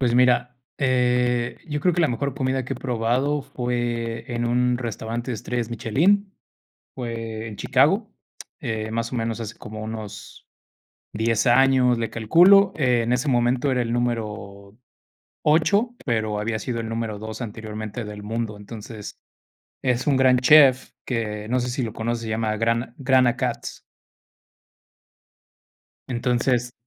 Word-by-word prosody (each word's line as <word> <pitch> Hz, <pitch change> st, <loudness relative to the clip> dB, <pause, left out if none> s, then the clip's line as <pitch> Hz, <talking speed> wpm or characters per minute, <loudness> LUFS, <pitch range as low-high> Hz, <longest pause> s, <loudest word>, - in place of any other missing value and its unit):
Pues 120 Hz, -2 st, +2 dB
mira, 125 Hz, 0 st, +3 dB, 0.2 s
eh, 125 Hz, -2 st, +1 dB
yo 150 Hz, -2 st, -3 dB
creo 180 Hz, +2 st, +2 dB
que 175 Hz, -, +2 dB
la 155 Hz, -, +3 dB
mejor 130 Hz, +2 st, -2 dB
comida 130 Hz, -2 st, -1 dB
que -, -, -3 dB
he -, -, -8 dB
probado 125 Hz, +4 st, 0 dB
fue 120 Hz, -3 st, -3 dB
en 120 Hz, 0 st, -2 dB
un 125 Hz, +1 st, +2 dB
restaurante 115 Hz, 0 st, -4 dB
de 120 Hz, -, -1 dB
estrellas 120 Hz, +1 st, -3 dB
Michelin, 180 Hz, -, +1 dB, 0.6 s
fue 115 Hz, -3 st, -5 dB
en 105 Hz, -, -8 dB
Chicago, -, -, +2 dB, 0.5 s
eh, 110 Hz, 0 st, -3 dB
más 115 Hz, +1 st, -2 dB
o 125 Hz, -, -4 dB
menos 115 Hz, 0 st, -2 dB
hace 110 Hz, -1 st, -6 dB
como 110 Hz, 0 st, -8 dB
unos 110 Hz, -2 st, -8 dB, 0.7 s
10 115 Hz, +1 st, +1 dB
años, 125 Hz, 0 st, +4 dB
le 115 Hz, -1 st, -2 dB
calculo. 180 Hz, -, +5 dB
Eh, 125 Hz, -5 st, +2 dB
en 120 Hz, +2 st, +1 dB
ese 125 Hz, +4 st, -1 dB
momento 125 Hz, +2 st, +2 dB
era 130 Hz, -1 st, +1 dB
el 120 Hz, -1 st, -1 dB
número 105 Hz, -4 st, -3 dB, 0.7 s
8 200 Hz, +10 st, +3 dB
pero 110 Hz, -3 st, 0 dB
había 110 Hz, +1 st, -2 dB
sido 120 Hz, 0 st, -3 dB
el 115 Hz, -1 st, -4 dB
número 115 Hz, -2 st, -3 dB
2 110 Hz, +2 st, -6 dB
anteriormente 110 Hz, 0 st, -6 dB
del 105 Hz, 0 st, -8 dB
mundo, 110 Hz, 0 st, -3 dB
entonces, 105 Hz, 0 st, -9 dB, 0.6 s
es 125 Hz, -2 st, 0 dB
un 140 Hz, -3 st, +3 dB
gran 130 Hz, -1 st, +5 dB
chef 130 Hz, -1 st, +6 dB
que 105 Hz, -3 st, -3 dB
no 125 Hz, +2 st, +1 dB
sé 125 Hz, -, -2 dB
si 125 Hz, +2 st, -2 dB
lo 110 Hz, -2 st, -4 dB
conoces, 115 Hz, +1 st, -3 dB
se 110 Hz, -, -5 dB
llama 110 Hz, -1 st, -1 dB
Grant 115 Hz, +2 st, 0 dB
Grant 130 Hz, -2 st, +3 dB
Achatz. 120 Hz, 0 st, -3 dB, 2.2 s
Entonces 120 Hz, 0 st, 0 dB
120 Hz, 150 wpm, -23 LUFS, 110-130 Hz, 2.2 s, chef